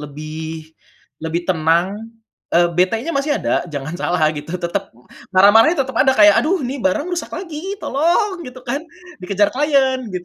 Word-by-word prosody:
lebih 155 +2 -7 0.5
lebih 160 +2 -3
tenang, 170 +4 +1 0.6
eee, 175 0 +4
betenya 220 - +1
masih 290 +2 0
ada, - - 0
jangan 150 0 -6
salah 175 -2 -1
gitu 150 +3 -7
tetep 190 +3 -3 0.4
marah-marahnya 225 - +6
tetep 265 - -8
ada 265 - +4
kayak, 205 -1 +6
"Aduh 340 +2 0
ini 265 +2 -4
barang 230 - 0
rusak 355 - -3
lagi, 350 +2 -5
tolong!" 350 - +1
gitu 250 0 -10
kan. 270 +3 -2 0.4
Dikejar 200 +2 +1
klien 270 -2 +2 0.2
gitu. 180 -1 -4
205 Hz, 150 wpm, -19 LUFS, 170-280 Hz, 0.6 s, marah-marahnya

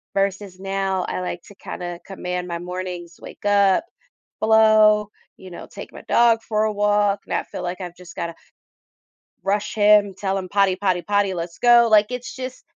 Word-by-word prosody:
versus 195 -1 -2
now 195 -1 -1
I - - -3
like 180 -1 -5
to 205 - -16
kinda 175 -2 -7
command 180 -2 -4
my 170 -1 -3
mornings, 180 -1 -6
wake - - -12
up, 200 +1 +4 0.6
hello, 215 -1 +5 0.3
you 190 - -12
know, 170 - -9
take - - -9
my - - -11
dog 235 -1 +4
for 215 -1 0
a 215 - 0
walk, 205 -1 +1
and - - -5
I - - +1
feel - - -8
like 180 +2 -4
I've 175 -1 -7
just 180 -1 -13
gotta 170 -1 -4 1.1
rush 205 +2 -1
him, 205 -2 +4
tell 195 0 -2
him, 185 -1 -6
"Potty, 195 -1 +2
potty, 185 -2 0
potty, 205 -1 +1
let's 170 -1 -6
go." 240 -1 +6
Like, 215 0 +5
it's 250 0 -6
just, 255 0 -7
195 Hz, 185 wpm, -22 LUFS, 180-210 Hz, 1.1 s, go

